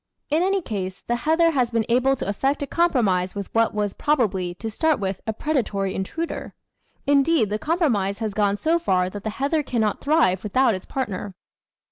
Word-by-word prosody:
In 310 +3 +3
any 385 0 +1
case, 190 - -4
the 240 - 0
heather 325 +6 +3
has 255 -6 +1
been 230 -2 0
able 255 +3 +3
to - - -5
effect 270 +8 0
a - - -1
compromise 220 - +1
with 200 -1 -6
what 230 0 +3
was 205 -2 -1
probably, 200 -12 0
to 225 - -6
start 315 +4 +1
with, 195 -1 -3
a - - +1
predatory 215 -7 -1
intruder; 325 - -4 0.5
indeed, 280 -5 +3
the 210 - -1
compromise 235 - 0
has 220 -2 -3
gone 205 -1 +1
so 325 +8 +1
far 185 - +1
that 205 0 -7
the 220 - -2
heather 280 +8 0
cannot 225 -6 -1
thrive 285 - +3
without 235 +3 +2
its 185 - -6
partner. 205 -6 -4
230 Hz, 185 wpm, -23 LUFS, 200-295 Hz, 0.5 s, In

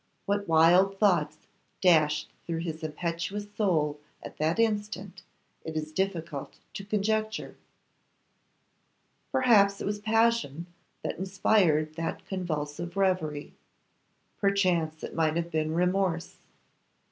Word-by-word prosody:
What 200 0 -1
wild 175 +4 +5
thoughts 175 -7 +2 0.4
dashed 155 -4 +3
through 165 -1 -3
his 160 -2 -5
impetuous 170 +6 -3
soul 155 -8 +1 0.2
at - - -9
that 160 +3 0
instant, 210 -4 -1 0.4
it 160 -1 -6
is 155 0 -4
difficult 165 -5 -3 0.2
to 195 - -6
conjecture. 215 +2 -1 1.8
Perhaps 205 -6 +4
it - - -4
was 205 +1 -2
passion 225 -8 +1 0.4
that - - -4
inspired 185 -5 +2
that 165 0 -4
convulsive 175 -1 -4
reverie; 165 -7 0 0.9
perchance 180 -6 +1
it - - -6
might 160 -1 +1
have 170 0 -2
been 155 0 -1
remorse. 180 -1 0
175 Hz, 110 wpm, -28 LUFS, 160-200 Hz, 1.8 s, wild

